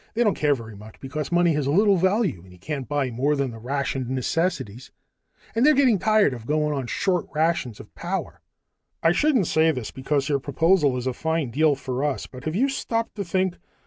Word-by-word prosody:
They 240 - +3
don't 210 -4 +3
care 145 -1 +2
very 115 -4 -9
much, 105 +2 -13
because 150 +4 -5
money 175 -1 +3
has 145 -2 -1
little 200 +7 +4
value 190 - +1
when 90 +1 -17
you 90 - -15
can't 135 - -5
buy 145 -3 0
more 135 +6 +1
than 140 -3 -1
the 115 - -10
rationed 135 0 -2
necessities. 130 - -2 0.6
And 225 +3 +1
they're 300 +1 +6
getting 255 -7 +4
tired 215 -6 +3
of 115 -2 -9
going 150 0 +1
on 135 -4 -3
short 180 +5 0
rations 155 -8 0
of - - -13
power." - - -4 0.6
"I 165 - +5
shouldn't 260 - +2
say 160 +1 +3
this, 125 -8 -3
because 140 +1 -1
your 140 -2 +1
proposal 150 0 +2
is 125 - -4
a 130 - -1
fine 160 -2 -2
deal 150 +2 +3
for 130 0 -4
us, 140 -7 -1
but 125 0 -12
have 155 +1 -2
you 255 +7 +3
stopped 230 -4 -2
to 200 - -2
think? 185 0 -1
150 Hz, 210 wpm, -24 LUFS, 130-180 Hz, 0.6 s, they're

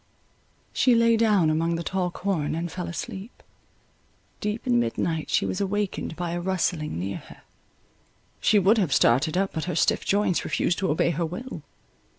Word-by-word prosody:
She 250 -2 +4
lay 230 0 +4
down 210 -8 +3
among 165 +2 0
the 170 - -3
tall 185 0 -1
corn, 175 -5 -2
and 170 +1 -3
fell 180 -2 -5
asleep. 190 +5 -7 1.0
Deep 210 +2 -3
in 120 -1 +3
midnight, 155 +7 -1
she - - +2
was 185 - -2
awaked 200 -3 -2
by 175 0 -3
a 175 0 -2
rustling 175 - -1
near 95 +3 -3
her; - - -14 1.0
she 215 - +3
would 205 +3 +4
have 160 -10 +1
started 150 +8 +3
up, 195 0 +1
but 160 - -3
her 180 -3 -3
stiff - - +2
joints 200 -3 +1
refused 175 - 0
to 195 - 0
obey 155 +3 +2
her 170 +1 -1
will. 240 +11 -7
180 Hz, 170 wpm, -25 LUFS, 160-200 Hz, 1.0 s, She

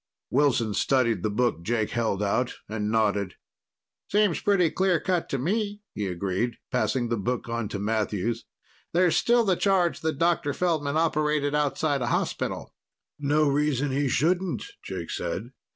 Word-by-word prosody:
Wilson 125 -6 +2
studied 115 -5 +2
the 110 - 0
book 115 -4 0
Jake 110 +3 -1
held 110 -4 0
out, 120 +5 0
and 105 0 -2
nodded. 105 -4 +1 0.8
"Seems 205 -5 +2
pretty 185 -5 +3
clear 185 -3 +2
cut 180 -1 -1
to 135 - -1
me," 205 - -1
he 105 -2 -3
agreed, 95 +6 -2
passing 125 -1 0
the 115 - 0
book 120 +5 -2
on 115 -2 -2
to 105 - -3
Matthews. 110 +1 -1 0.5
"There's 175 0 +3
still 240 0 +4
the 190 -3 +3
charge 185 -2 +2
that 160 -3 -2
Dr. 165 -4 +1
Feldman 155 -5 0
operated 150 -2 +1
outside 150 -1 +1
a 120 - -1
hospital." - - -2 0.5
"No 150 +1 +2
reason 145 -1 +1
he 140 +1 +1
shouldn't," 175 +6 +1 0.2
Jake - - -6
said. - - -4
140 Hz, 150 wpm, -26 LUFS, 115-170 Hz, 0.8 s, still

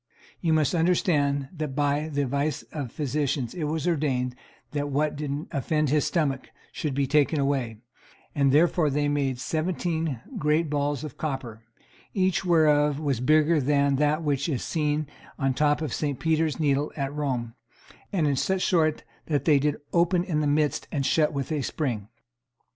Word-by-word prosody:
You 165 - 0
must 155 -1 +2
understand 155 -5 +2
that 150 -4 -4
by 145 +1 0
the 145 -1 0
advice 140 +3 -1
of 145 -4 -4
the - - -18
physicians 140 -4 -1
it 165 -4 -3
was 160 +3 -2
ordained 135 -7 0 0.4
that 145 -1 -2
what 150 +2 0
did 145 +1 -3
offend 150 0 0
his 150 -1 +2
stomach 140 -6 -1 0.2
should 145 -4 -3
be 140 0 +1
taken 150 +2 +2
away; 135 -5 0 0.6
and 140 -2 +3
therefore 160 +1 +3
they 145 +1 0
made 140 -3 0
seventeen 160 -1 -2 0.2
great 150 +1 +1
balls 145 -1 -1
of 150 -4 -8
copper, 130 -7 -4 0.5
each 190 -1 +1
whereof 150 -4 +3
was 140 -6 -1
bigger 155 +4 +3
than 140 0 +2
that 150 +2 +1
which 145 0 0
is 135 -6 -1
to - - -6
be - - -6
seen 150 -1 0 0.3
on 135 -1 +1
the 130 - -6
top 150 +1 +2
of 150 - -3
St. 145 -4 -2
Peter's 160 -1 +1
needle 145 -1 +1
at 140 0 -2
Rome, 130 -6 -2 0.6
and 180 -7 +1
in 145 -2 +2
such 190 +7 0
sort 155 -4 +2 0.2
that 145 -3 0
they 150 -3 +5
did 150 +1 0 0.2
open 175 +1 +3
in 170 -5 -1
the 150 - +1
midst 150 0 +1
and 140 -3 -1
shut 155 +1 +3
with 140 0 -4
a 150 -2 0
spring. 120 -7 -3
150 Hz, 180 wpm, -26 LUFS, 140-155 Hz, 0.6 s, they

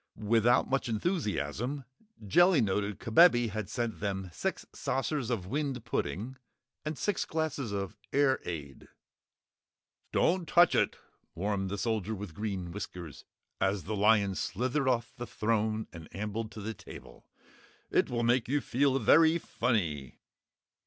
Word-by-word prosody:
Without 115 +3 +3
much 135 -2 0
enthusiasm, 120 - -2 0.4
Jellia 175 - +5
noted 100 -1 0
Kabebe 120 0 +5
had 105 -1 -4
sent 120 0 -3
them 95 -2 -3
six - - -3
saucers 135 -2 -2
of 110 -7 -1
wind 135 +1 -2
pudding 115 - -3 0.5
and 155 0 -4
six 205 -3 0
glasses 155 -7 -2
of 100 -1 -3 0.2
air 135 -1 +3
ade. 75 -6 -7 1.2
"Don't 175 0 +2
touch 175 0 +6
it!" - - +2 0.4
warned 95 +1 -1
the 100 - -3
Soldier 110 -1 -1
with 100 -4 -7
Green 95 -3 -4
Whiskers, 90 -5 -7 0.3
as 95 -1 +1
the 110 +6 -3
lion 105 -1 +4
slithered 130 +9 -1
off 120 -2 0
the 120 -1 -5
throne 110 -1 0
and 80 -2 -10
ambled 105 +2 -3
to 110 - -7
the 110 +2 -4
table. - - -13 0.6
"It - - +3
will 120 -1 -1
make 120 0 +2
you 145 +4 +1
feel 135 0 +1
very 160 +7 +5
funny." 90 - -1
110 Hz, 140 wpm, -30 LUFS, 100-130 Hz, 1.2 s, touch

